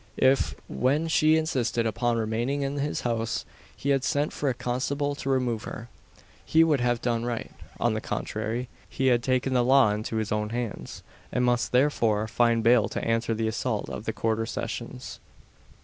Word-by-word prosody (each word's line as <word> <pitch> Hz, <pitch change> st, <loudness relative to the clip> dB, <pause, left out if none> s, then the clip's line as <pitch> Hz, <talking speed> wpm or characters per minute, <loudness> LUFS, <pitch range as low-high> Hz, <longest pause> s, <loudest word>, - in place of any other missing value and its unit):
If, 135 Hz, +1 st, +3 dB
when 140 Hz, -, +1 dB
she 155 Hz, 0 st, +4 dB
insisted 125 Hz, -7 st, 0 dB
upon 115 Hz, +2 st, 0 dB
remaining 115 Hz, +6 st, -1 dB
in 140 Hz, +1 st, -2 dB
his 145 Hz, +1 st, -1 dB
house, 115 Hz, -2 st, -1 dB, 0.3 s
he 140 Hz, -, -3 dB
had 135 Hz, -2 st, +2 dB
sent 145 Hz, +1 st, 0 dB
for 145 Hz, -, -1 dB
a -, -, +1 dB
constable 140 Hz, +4 st, -1 dB
to 140 Hz, -1 st, -5 dB
remove 125 Hz, -4 st, 0 dB
her, 115 Hz, +1 st, -7 dB, 0.5 s
he 160 Hz, +1 st, +4 dB
would 155 Hz, -4 st, +3 dB
have 120 Hz, -1 st, 0 dB
done 120 Hz, -1 st, 0 dB
right. 120 Hz, -1 st, -3 dB, 0.3 s
On -, -, +2 dB
the -, -, -2 dB
contrary, 120 Hz, +4 st, -3 dB, 0.2 s
he 130 Hz, 0 st, +1 dB
had 120 Hz, -, +1 dB
taken 130 Hz, +1 st, 0 dB
the 125 Hz, -1 st, +3 dB
law 130 Hz, -3 st, +5 dB
into 105 Hz, +2 st, -3 dB
his 110 Hz, -1 st, -1 dB
own 105 Hz, 0 st, 0 dB
hands, 120 Hz, -2 st, -5 dB, 0.3 s
and 125 Hz, -, +1 dB
must 120 Hz, -1 st, +1 dB
therefore 115 Hz, -5 st, +2 dB
find 115 Hz, 0 st, +2 dB
bail 115 Hz, -2 st, +4 dB
to -, -, -4 dB
answer 115 Hz, 0 st, +1 dB
the 110 Hz, 0 st, -1 dB
assault 110 Hz, 0 st, -2 dB
at 105 Hz, -, -6 dB
the -, -, 0 dB
Quarter 115 Hz, 0 st, -1 dB
Sessions. 65 Hz, -, -5 dB
120 Hz, 180 wpm, -27 LUFS, 115-135 Hz, 0.5 s, law